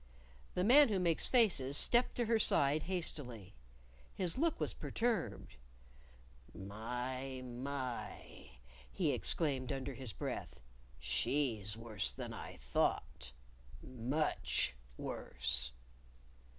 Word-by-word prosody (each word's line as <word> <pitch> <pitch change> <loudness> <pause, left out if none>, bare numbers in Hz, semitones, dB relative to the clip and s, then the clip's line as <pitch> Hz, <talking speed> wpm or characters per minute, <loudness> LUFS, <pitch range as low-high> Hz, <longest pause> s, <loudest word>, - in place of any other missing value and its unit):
The 180 - +1
Man 265 +6 +7
Who 200 -3 +1
Makes 170 -3 +3
Faces 170 - +4
stepped 240 +1 +4
to 240 - 0
her 225 0 +2
side 145 -6 +4
hastily. 125 - -1 0.6
His 180 -3 +1
look 325 +4 +1
was - - -1
perturbed. 225 - -2 1.0
"My! 125 +6 -5
My!" 125 - -6 0.4
he - - +1
exclaimed 135 -5 +1
under 135 0 -3
his 130 -3 -5
breath. - - -5 0.4
"She's 105 - 0
worse 110 - -1
than - - -6
I - - -8
thought! 60 +1 -1 0.5
much 130 - -1 0.2
worse." 60 -1 -2
130 Hz, 100 wpm, -36 LUFS, 115-170 Hz, 1.0 s, Man